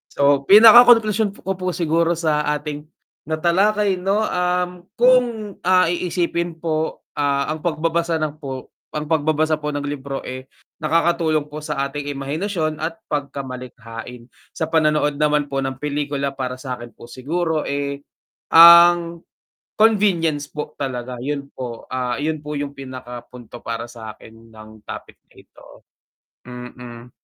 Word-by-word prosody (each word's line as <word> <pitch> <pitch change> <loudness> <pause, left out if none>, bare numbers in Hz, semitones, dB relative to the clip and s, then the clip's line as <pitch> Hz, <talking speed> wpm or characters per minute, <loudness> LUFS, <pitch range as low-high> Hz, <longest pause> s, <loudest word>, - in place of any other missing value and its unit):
So, 140 -1 +2
pinakakonklusyon 220 -1 +7
ko 190 -1 -3
po 185 -1 -2
siguro 170 0 +1
sa 155 -2 0 0.2
ating 150 0 -6 0.4
natalakay, 190 +5 +1
'no, 195 +4 +1
um, 180 -1 0 0.3
kung, 240 -4 +2
ah, 185 -1 +4
iisipin 170 -1 -2
po, 160 -1 -2 0.2
ah, 140 +1 0
ang 155 - -4
pagbabasa 165 +1 -1
ng 155 0 -4
po, 135 -4 -7 0.2
ang 150 +1 -4
pagbabasa 155 0 +1
po 150 -1 -4
ng 145 - -3
libro, 140 -1 -5
eh, 130 +1 -7 0.3
nakakatulong 160 -1 +1
po 150 - -6
sa 150 -2 -3
ating 145 +1 -6
imahinasyon 155 +3 -2
at 165 +1 -5
pagkamalikhain. 125 -4 -6 0.2
Sa 160 0 -3
panonood 150 -2 +2
naman 150 -1 +1
po 135 - -1
ng 135 0 -2
pelikula 145 -1 -2
para 130 -2 -4
sa'kin 125 -2 -8
po 120 - -14
siguro, 160 +4 -2
eh, 140 0 -3 0.6
ang 170 0 +8 0.6
convenience 180 -9 +3
po 150 0 -6
talaga 125 -2 -4
yun 140 +2 -4
po, 120 -3 -7
ah, 125 0 -2
yun 155 0 -1
po 150 - -5
yung 145 -1 -3
pinaka 130 -2 -8
punto 120 -1 -11
para 115 +1 -4
sa'kin 115 0 -12
ng 110 0 -14
topic - - -9
na - - -28
ito, - - -19 0.8
mm. 125 -1 -10
150 Hz, 135 wpm, -21 LUFS, 135-170 Hz, 0.8 s, ang